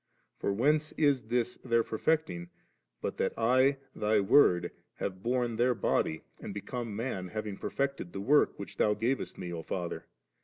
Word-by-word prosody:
For - - 0
whence 150 +9 +2
is 140 -7 +2
this 120 +1 0
their 115 -2 +3
perfecting, 110 - -1 0.5
but - - -2
that - - 0
I, 130 +4 +4 0.2
Thy 105 0 +2
Word, 95 -3 +5 0.2
having 95 -1 -4
borne 120 +1 0
their 125 +1 +3
body, 80 -7 0 0.2
and 100 - -7
become 115 +1 -4
num, 105 -5 -3
have 110 +4 -4
perfected 140 -10 -2
the 95 - -5
work, 145 +9 +3
which 100 - -8
Thou 105 -1 +3
gavest 125 +5 -1
Me, 90 -1 -5
O 85 - -4
Father? 85 +1 -4
115 Hz, 160 wpm, -31 LUFS, 100-130 Hz, 0.5 s, Word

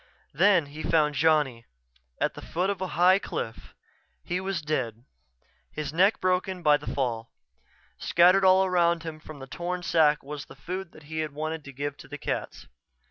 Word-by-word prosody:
Then 180 +1 +4
he 145 +2 -9
found 150 -2 +2
Johnny, 150 -6 +2 0.6
at - - 0
the - - -10
foot 185 +4 -1
of 195 -2 -6
a 185 - -1
high 185 +2 +6
cliff. 115 - -6 0.5
He 180 +1 -2
was 190 -4 -3
dead, 125 -6 -3 0.7
his 150 -1 -5
neck 190 +6 +3
broken 185 0 0
by 150 -1 +5
the 145 - -6
fall. 115 -4 -2 0.7
Scattered 180 +3 +4
all 190 0 +6
around 170 -2 +2
him 160 -2 -7
from 155 -1 -11
the 135 - -9
torn 175 +5 -4
sack 155 -3 +3
was 145 +1 -7
the - - -14
food 180 +3 -7
he 155 +2 -5
had 155 -2 -3
wanted 155 +1 -4
to 140 - -8
give 145 +2 -4
to - - -13
the 145 - -7
cats. - - -4
160 Hz, 180 wpm, -27 LUFS, 145-180 Hz, 0.7 s, high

